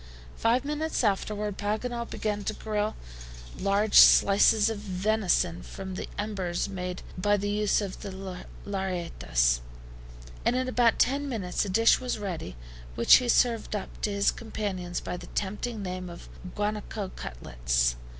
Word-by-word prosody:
Five 245 +4 +1
minutes 300 0 -1
afterward 210 0 -1
Paganel 235 +3 -2
began 210 -1 -2
to 215 - -1
grill 215 0 -2 0.6
large 200 +2 +4
slices 205 +2 +6
of 225 -2 -2
venison 190 -3 0 0.2
on 190 -1 -5
the 185 - -5
embers 195 -5 -2
made 180 -2 -5 0.2
by 205 +2 +3
the 205 +1 -2
use 210 0 +2
of 195 -2 -5
the 200 - -6 0.6
LLARETTAS, 170 - 0 0.8
and 245 - +2
in 255 0 0
about 245 -2 +3
ten 280 +3 +1
minutes 205 -6 -1
a - - -4
dish 225 +4 +4
was 250 -2 -2
ready, 185 - -5 0.4
which - - +7
he 245 - -2
served 230 -2 +2
up 205 - -6
to 210 - 0
his 200 0 +2
companions 195 -6 -4
by 180 - -4
the - - -10
tempting 210 +2 -3
name 185 -1 -5
of 170 - -11 0.3
guanaco 210 -1 -3
cutlets. - - -1
205 Hz, 145 wpm, -28 LUFS, 185-220 Hz, 0.8 s, which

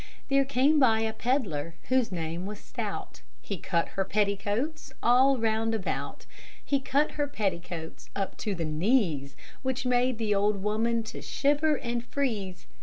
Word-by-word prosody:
There 275 0 +4
came 280 +3 +3
by 225 -5 +5
a 220 0 0
pedlar 195 - -1
whose 255 -4 +2
name 170 +1 -3
was 210 0 -6
Stout, - - -5 0.2
He 200 -4 -5
cut 170 0 0
her 195 - -1
petticoats 210 +9 -1
all 260 +3 +5
round 225 0 +1
about; 200 -4 -3 0.4
He 280 - +2
cut 280 +3 +1
her 290 -1 -1
petticoats 175 - -4
up 195 -1 -2
to 205 -2 -2
the 170 -2 -2
knees, 155 - +1 0.3
Which 260 -1 -2
made 250 0 +2
the 220 -2 +1
old 200 0 +1
woman 225 +2 +1
to 220 - -7
shiver 295 +2 +2
and 235 -1 -3
freeze. 220 -9 -2
220 Hz, 155 wpm, -28 LUFS, 195-260 Hz, 0.4 s, by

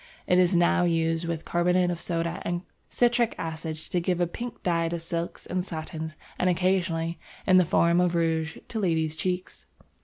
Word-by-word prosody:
It 180 - +4
is 180 0 +4
now 175 +1 +4
used 165 -1 +1
with 165 -1 -3
carbonate 180 +1 +2
of 170 -1 -4
soda 170 0 -2
and 175 +1 -2 0.3
citric 240 -1 +2
acid 160 -1 -4
to 160 +3 -2
give 180 0 0
a 175 - +3
pink 235 +7 -7
dye 165 -2 +1
to 170 - -2
silks 165 +1 -4
and 180 0 -1
satins, 160 -2 -6 0.2
and 185 - +3
occasionally, 175 -2 0 0.3
in 185 -1 +6
the 185 - +5
form 170 +1 +3
of 175 -1 +1
rouge, 160 -1 0
to 225 - -3
ladies' 160 -5 +1
cheeks! 180 +3 -3
170 Hz, 180 wpm, -27 LUFS, 165-180 Hz, 0.3 s, in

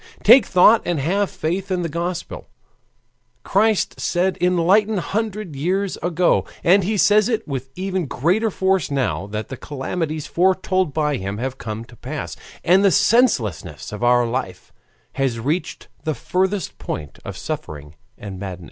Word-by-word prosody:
Take 240 +5 +7
thought 195 +5 +6
and 175 -3 -1
have 195 +8 0
faith 185 +1 -3
in 180 -2 -1
the - - -1
Gospel, 170 +2 -5 0.9
Christ 215 +1 +1
said 185 +1 0
eighteen 185 +4 +3
hundred 210 -2 -3
years 185 +7 -1
ago, 175 +1 +1 0.2
and 190 +3 +5
he 210 +4 -1
says 210 +3 +4
it 225 -4 -1
with 135 -2 -4
even 185 -3 -2
greater 180 - +1
force 190 -2 0
now 130 -8 -1
that 105 +1 -5
the 130 - -6
calamities 150 +3 -4
foretold 185 -1 +1
by 150 -1 0
him 100 +2 -4
have 130 +3 -4
come 110 +1 -5
to 120 - -16
pass, 145 +6 -6 0.3
and 185 +3 +4
the 200 - +6
senselessness 190 - +1
of 105 +3 -6
our 120 0 +4
life 125 +3 -4 0.5
has 125 -4 0
reached 150 +10 -3 0.2
the 155 -2 -1
furthest 190 - -1
point 75 -2 -6
of - - -7
suffering 75 -1 -6 0.2
and 100 -3 -8
madness. 95 -2 -6
175 Hz, 155 wpm, -21 LUFS, 130-195 Hz, 0.9 s, Take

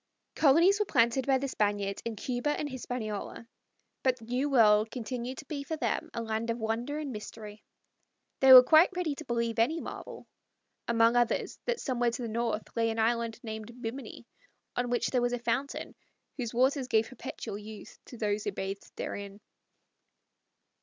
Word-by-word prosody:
Colonies 335 +7 +5
were 420 - +2
planted 240 -1 +2
by 270 -1 +4
the 275 +1 -2
Spaniards 205 -4 -1
in 230 -1 -4
Cuba 245 +6 -2
and 300 - -2
Hispaniola, 230 -4 -5 0.5
but 255 -1 +2
the 230 - -13
New 250 +5 -1
World 215 -4 +5
continued 250 +1 -5
to - - -8
be 285 0 -4
for 320 - -3
them 325 +1 -1
a 230 - -2
land 220 +1 -2
of 230 - 0
wonder 235 +6 -2
and 300 -3 -4
mystery. 210 -1 -9 0.8
They 265 0 +6
were 255 -1 +13
quite 315 +6 +6
ready 350 -5 -1
to - - -8
believe 235 -2 -1
any 310 +9 +2
marvel, - - -8 0.6
among 230 0 +4
others, 240 -1 +1
that 485 -1 -1
somewhere 245 -3 0
to 235 +2 -5
the - - -3
north 225 -1 -1
lay 230 -1 +2
an 225 - -3
island 230 0 0
named 220 +2 -7
Bimini, 245 +3 -7 0.5
on 245 0 -1
which 245 0 +1
was 245 -1 +2
a - - 0
fountain 245 +4 -2 0.4
whose 240 -4 -4
waters 260 +2 +2
gave 225 -3 +2
perpetual 225 -4 -7
youth 210 0 -11
to 245 - -11
all 205 0 0
who - - -2
bathed 195 +1 -6
therein. 200 0 -6
240 Hz, 175 wpm, -30 LUFS, 225-265 Hz, 0.8 s, were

